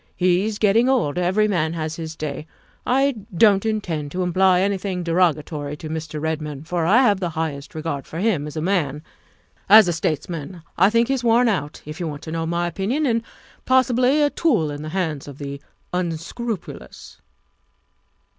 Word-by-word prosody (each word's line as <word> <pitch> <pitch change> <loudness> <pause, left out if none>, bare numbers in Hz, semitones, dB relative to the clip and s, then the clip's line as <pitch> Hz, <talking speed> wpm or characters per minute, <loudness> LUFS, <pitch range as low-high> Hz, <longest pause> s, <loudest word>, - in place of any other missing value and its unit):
He's 185 +4 +1
getting 225 +4 +3
old. 215 - +1
Every 190 +4 +2
man 165 -5 0
has 160 -1 -3
his 160 -1 -6
day. 150 0 -5 0.4
I 270 0 +2 0.2
don't 205 0 +5
intend 165 -9 -2
to 185 0 -1
imply 185 +1 +3
anything 195 -2 -1
derogatory 155 -4 0
to 155 0 -8
Mr. 155 -1 -5
Redmond, 155 -1 -4
for 170 -2 -1
I 235 +8 +5
have 205 -6 +3
the 180 -3 -2
highest 150 -3 -4
regard 155 -3 -4
for 160 - -8
him 180 -7 0
as 150 - -8
a - - -1
man. 155 -5 -1 0.7
As 215 -1 +9
a 175 - +1
states 160 -2 -2
man, 170 0 -7
I 190 +3 +5
think 230 +1 +2
he's 270 -2 -1
worn 235 +1 +4
out, 155 -9 -2
if 150 +1 -8
you 175 - -2
want 145 -1 -7
to 160 - -7
know 165 0 -2
my 170 +1 0
opinion, 205 - -1
and 230 -3 +1 0.5
possibly 255 +2 +3
a 290 - +2
tool 215 - +1
in 145 0 -6
the 155 - -6
hands 160 -6 -2
of 140 -2 -9
the 140 -1 -6 0.3
un 175 -3 -1
scrupulous. 195 - -7
175 Hz, 185 wpm, -22 LUFS, 155-215 Hz, 0.7 s, As